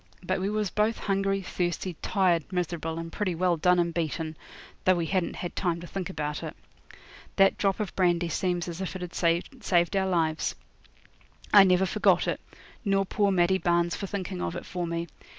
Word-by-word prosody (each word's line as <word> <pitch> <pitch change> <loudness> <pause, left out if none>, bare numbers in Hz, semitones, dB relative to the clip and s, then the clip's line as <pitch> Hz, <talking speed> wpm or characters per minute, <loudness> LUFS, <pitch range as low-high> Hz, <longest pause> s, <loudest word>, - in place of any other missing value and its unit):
But 185 +1 -1
we 190 +2 -1
was 210 -2 -1
both 215 +2 +1
hungry, 195 0 0
thirsty, 175 +1 -2
tired, 180 -4 +1
miserable, 170 -3 -2
and 165 0 -5
pretty 185 -3 -1
well 180 +1 +2
done 180 +3 +3
and 170 -1 +1
beaten, 160 -1 -2 0.5
though 185 - +5
we 170 -1 -1
hadn't 185 0 -1
had 175 - -5
time 175 -3 0
to 175 - -8
think 185 0 -4
about 150 -1 -3
it. - - -6 0.8
That 195 0 +5
drop 195 0 0
of 210 -3 -3
brandy 175 -2 +2
seemed 175 +1 -1
as 170 +1 -5
if 190 - -4
it 185 - -5
had 175 - -7
saved 175 +1 +1
our 190 -1 +2
lives. 165 -3 0 1.0
I 200 - +10
never 185 0 +4
forgot 190 - +3
it, - - -1 0.4
nor 195 -2 +2
poor 205 +1 +1
Maddie 190 0 +3
Barnes 170 -1 +1
for 195 - -4
thinking 185 -2 -4
of 170 - -2
it - - -6
for 180 -1 -3
me. 170 0 -2
180 Hz, 190 wpm, -27 LUFS, 170-195 Hz, 1.0 s, I